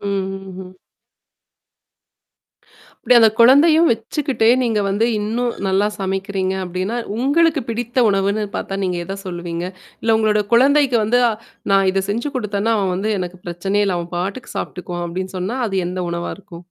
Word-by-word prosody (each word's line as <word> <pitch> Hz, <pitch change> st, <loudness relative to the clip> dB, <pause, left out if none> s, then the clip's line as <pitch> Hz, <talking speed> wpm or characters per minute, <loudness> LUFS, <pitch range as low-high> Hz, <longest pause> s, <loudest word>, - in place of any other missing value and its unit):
ம்ஹ்ம். 195 Hz, -2 st, -5 dB, 2.3 s
இப்டி 250 Hz, -, +6 dB
அந்த 225 Hz, -1 st, +7 dB
குழந்தையும் 310 Hz, +7 st, +6 dB
வச்சுக்கிட்டே 230 Hz, +1 st, -1 dB
நீங்க 225 Hz, -4 st, +1 dB
வந்து 205 Hz, +4 st, +1 dB
இன்னும் 235 Hz, +3 st, -1 dB
நல்லா 195 Hz, +2 st, +2 dB
சமைக்கிறீங்க 190 Hz, 0 st, -2 dB
அப்டின்னா, 185 Hz, +6 st, -3 dB, 0.2 s
உங்களுக்கு 300 Hz, +5 st, +2 dB
பிடித்த 240 Hz, +2 st, 0 dB
உணவுன்னு 200 Hz, +2 st, +1 dB
பார்த்தா 195 Hz, 0 st, -4 dB
நீங்க 180 Hz, -1 st, -1 dB
எத 195 Hz, +2 st, -5 dB
சொல்லுவீங்க? 175 Hz, -1 st, -4 dB, 0.4 s
இல்ல 225 Hz, 0 st, +3 dB
உங்களோட 210 Hz, -1 st, +2 dB
குழந்தைக்கு 270 Hz, +1 st, +4 dB
வந்து 245 Hz, +3 st, +2 dB, 0.5 s
நான் 195 Hz, -1 st, +4 dB
இத 195 Hz, 0 st, 0 dB
செஞ்சு 235 Hz, +8 st, -2 dB
குடுத்தேன்னா, 210 Hz, 0 st, 0 dB
அவன் 190 Hz, -2 st, 0 dB
வந்து 200 Hz, +4 st, -1 dB
எனக்கு 180 Hz, 0 st, -6 dB
பிரச்சனையே 195 Hz, +4 st, 0 dB
இல்ல. 180 Hz, -2 st, 0 dB
அவன் 170 Hz, +1 st, -7 dB
பாட்டுக்கு 195 Hz, +8 st, -4 dB
சாபிடுக்குவான் 175 Hz, -1 st, -5 dB
அப்டின்னு 185 Hz, +2 st, -5 dB
சொன்னா, 195 Hz, +8 st, -3 dB
அது 195 Hz, -4 st, -1 dB
எந்த 180 Hz, 0 st, -3 dB
உணவா 170 Hz, 0 st, -3 dB
இருக்கும்? 195 Hz, -4 st, -12 dB
200 Hz, 145 wpm, -19 LUFS, 185-235 Hz, 2.3 s, அந்த